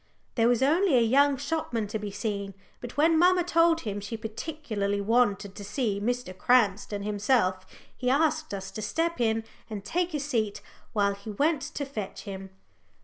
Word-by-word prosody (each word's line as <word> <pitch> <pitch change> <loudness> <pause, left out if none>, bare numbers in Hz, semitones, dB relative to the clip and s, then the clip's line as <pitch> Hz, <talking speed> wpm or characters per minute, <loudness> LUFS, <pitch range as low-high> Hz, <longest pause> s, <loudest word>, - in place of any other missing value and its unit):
There 230 -1 +3
was 245 +1 +3
only 320 +1 +4
a - - +5
young 275 +4 +4
shopman 280 -6 -2
to 220 - -3
be 210 -1 -4
seen, 200 -1 -4 0.2
but 245 +2 -9
when 320 +2 +4
mamma 360 +1 +5
told 335 -1 +3
him 205 -3 -4
she 205 +3 -5
particularly 220 -3 -3
wanted 205 -2 +1
to 205 - -9
see 210 -1 -1
Mr. 245 -4 -2
Cranston 205 -3 +2
himself, 205 -3 +1 0.3
he 250 - -1
asked 310 +3 +2
us 195 -1 -5
to 215 - -6
step 330 +7 -1
in 225 -1 +1 0.3
and 205 -2 -6
take 350 +4 -1
a - - 0
seat 230 -8 -1 0.3
while 200 -2 +2
he 200 +2 -10
went 290 +8 +1
to 290 0 -4
fetch 215 -8 -6
him. 195 -2 -7
230 Hz, 175 wpm, -28 LUFS, 205-290 Hz, 0.3 s, a